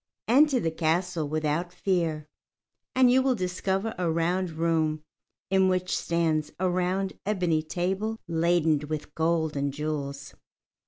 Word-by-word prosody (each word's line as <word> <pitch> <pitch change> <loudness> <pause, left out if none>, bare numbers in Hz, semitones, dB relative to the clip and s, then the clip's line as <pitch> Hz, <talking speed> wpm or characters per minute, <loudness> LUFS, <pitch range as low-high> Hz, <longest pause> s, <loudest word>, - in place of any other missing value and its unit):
Enter 275 +2 +5
the 165 - -1
castle 165 0 0
without 155 +3 -1
fear, 170 -5 -1 0.7
and 255 -1 +6
you 260 +1 +5
will 260 -1 +2
discover 190 +2 -1
a 175 -2 +1
round 175 +3 0
room 160 -1 0 0.5
in 190 -1 +4
which 185 -1 0
stands 160 -3 0
a 185 - +1
round 185 +2 0
ebony 180 -6 +1
table 190 +7 -2
laden 165 -2 +2
with 155 0 -5
gold 160 -1 0
and 140 0 -1
jewels. 145 -1 -4
170 Hz, 130 wpm, -27 LUFS, 155-190 Hz, 0.7 s, and